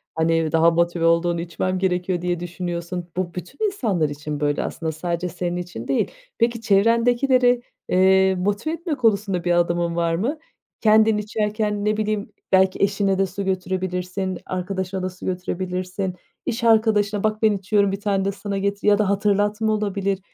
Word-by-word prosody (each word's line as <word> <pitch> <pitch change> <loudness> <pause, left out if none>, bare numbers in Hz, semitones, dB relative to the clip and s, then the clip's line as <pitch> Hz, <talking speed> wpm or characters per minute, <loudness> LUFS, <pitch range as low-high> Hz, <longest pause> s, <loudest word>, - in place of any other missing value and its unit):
hani, 165 -1 +1
daha 165 +1 +5
motive 170 0 +1
olduğunu 170 0 +2
içmem 185 +2 -2
gerekiyor, 180 -1 0
diye 175 -1 -1
düşünüyorsun. 175 0 -5
Bu, 180 -2 -2
bütün 180 - -4
insanlar 210 - 0
için 150 0 -5
böyle 145 0 0
aslında, 160 -1 -3
sadece 170 +2 -3
senin 175 +1 -3
için 175 -10 -6
değil. 135 - 0 0.3
Peki, 230 0 +1
çevrendekileri, 240 +4 +3 0.3
eee, 190 +1 +4
motive 205 - -1
etme 335 -2 -3
konusunda 200 -6 +1
bir 175 - +1
adımın 170 0 +1
var 170 -1 +1
mı? 245 - -1 0.4
Kendin 220 0 +5
içerken, 210 0 -1
ne 215 0 +1
bileyim, 215 -1 -2 0.2
belki 190 0 +4
eşine 200 -1 +1
de 195 - +3
su 195 +1 -5
götürebilirsin, 185 0 -2
arkadaşına 185 0 -3
da 185 - -1
su 185 - -11
götürebilirsin, 185 +1 -3 0.3
iş 235 +1 -3
arkadaşına 215 -3 +3
"Bak, 215 0 0
ben 220 -1 +5
içiyorum, 200 +1 +1
bir 195 - -3
tane 200 -2 0
de 200 - +1
sana 200 0 -4
getir" 200 +1 -2
ya 205 -1 +6
da 210 -2 +1
hatırlatma 205 +2 +1
olabilir, 200 -2 -1
190 Hz, 160 wpm, -22 LUFS, 175-210 Hz, 0.4 s, ya